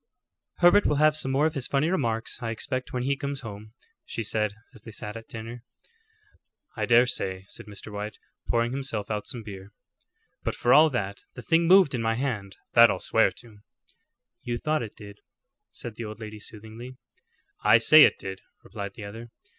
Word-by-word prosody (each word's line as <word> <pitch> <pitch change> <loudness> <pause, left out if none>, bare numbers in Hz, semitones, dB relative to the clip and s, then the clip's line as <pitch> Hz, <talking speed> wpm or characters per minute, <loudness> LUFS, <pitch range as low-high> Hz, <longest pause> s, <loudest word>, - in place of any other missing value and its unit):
"Herbert 175 +4 +5
will 150 - +2
have 155 +1 +4
some 135 - -2
more 135 +3 +2
of 160 - +1
his 135 -5 -2
funny 140 +3 +1
remarks, 115 -12 -2
I 115 - -3
expect, 130 +3 -3
when 125 -1 -2
he 140 +2 +1
comes 140 0 -4
home," 110 -1 -9 0.3
she 115 - -4
said, 105 -1 -1 0.2
as 115 - -13
they 115 - -11
sat 105 0 -6
at 115 0 -9
dinner. 115 +2 -8 1.1
"I - - -2
dare 120 +1 +6
say," 95 -6 -2
said - - -10
Mr. 105 +1 -9
White, 105 +1 -5 0.3
pouring 120 0 +1
himself 125 -6 -3
out 105 -1 -3
some 120 -4 -6
beer; 100 -1 -10 0.7
"but - - -2
for 120 - +3
all 155 +3 +7
that, 100 -7 -3 0.2
the - - -8
thing 165 0 +3
moved 185 -5 +6
in 125 - -1
my 115 0 +1
hand; 110 -7 -3 0.2
that 115 0 +8
I'll - - 0
swear 110 - +3
to." 110 -4 -17 0.8
"You 120 -1 -3
thought 155 +4 0
it 110 -3 -7
did," 100 -1 -11 0.5
said 115 -3 -8
the 115 - -5
old 105 0 -8
lady 110 -1 -8
soothingly. 110 +4 -9 0.7
"I - - +7
say 150 +7 +8
it - - +5
did," 95 -1 -7 0.2
replied 100 -1 -7
the 105 - -9
other. 115 +3 -9
115 Hz, 195 wpm, -26 LUFS, 105-135 Hz, 1.1 s, that